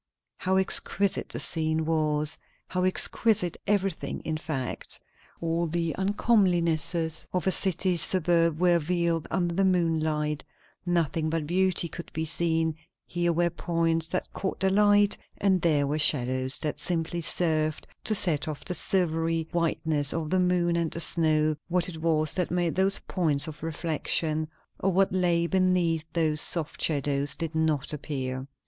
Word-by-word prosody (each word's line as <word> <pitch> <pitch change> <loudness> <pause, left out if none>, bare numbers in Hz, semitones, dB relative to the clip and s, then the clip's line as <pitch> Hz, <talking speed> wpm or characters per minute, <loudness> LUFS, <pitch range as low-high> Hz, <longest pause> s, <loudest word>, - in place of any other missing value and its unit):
How 190 +1 +1
exquisite 195 +1 +3
the - - -5
scene 160 -1 0
was! 155 -1 +1 0.3
how 180 0 -1
exquisite 190 0 +2
everything, 195 -4 -1
in 160 - -3
fact. 155 -5 -4 0.4
All 165 +1 -1
the 165 0 -1
uncomelinesses 175 -6 +1
of 180 -2 -2
a 190 - +3
city 185 -1 +2
suburb 165 -1 +2
were 175 -1 +4
veiled 170 0 -1
under 175 -2 -1
the 195 +3 +1
moonlight; 160 -5 0 0.4
nothing 165 -2 0
but 160 -1 -2
beauty 180 +1 +2
could 170 +1 -8
be 160 +1 -2
seen; 160 -1 0 0.3
here 175 0 -1
were 170 +1 +1
points 165 -1 -1
that 185 - -4
caught 190 - -4
the 190 0 +1
light, 205 0 +4 0.2
and 190 -3 +2
there 150 -4 +2
were 150 +2 -1
shadows 130 -2 +1
that 150 - -3
simply 170 -1 -2
served 155 -2 0 0.2
to 215 - +2
set 165 -5 +3
off 155 -2 -6
the 180 - -2
silvery 165 -3 0
whiteness 160 -4 0
of 160 -2 -3
the 185 - +2
moon 180 -1 +1
and 170 -1 0
the 170 - -4
snow; 155 -2 +2
what 175 0 +1
it 160 -3 -7
was 155 -2 +2
that 180 -2 -1
made 175 -1 0
those 190 +1 +3
points 155 -6 +1
of 155 -2 -9
reflection, 155 -1 -1 0.3
or 195 - +1
what 190 +1 +2
lay 175 -2 +2
beneath 180 -3 +1
those 155 -3 +1
soft 165 -3 -1
shadows, 140 -2 +1
did 165 -1 -4
not 155 -3 0
appear. 130 -3 -4
165 Hz, 155 wpm, -27 LUFS, 155-180 Hz, 0.4 s, were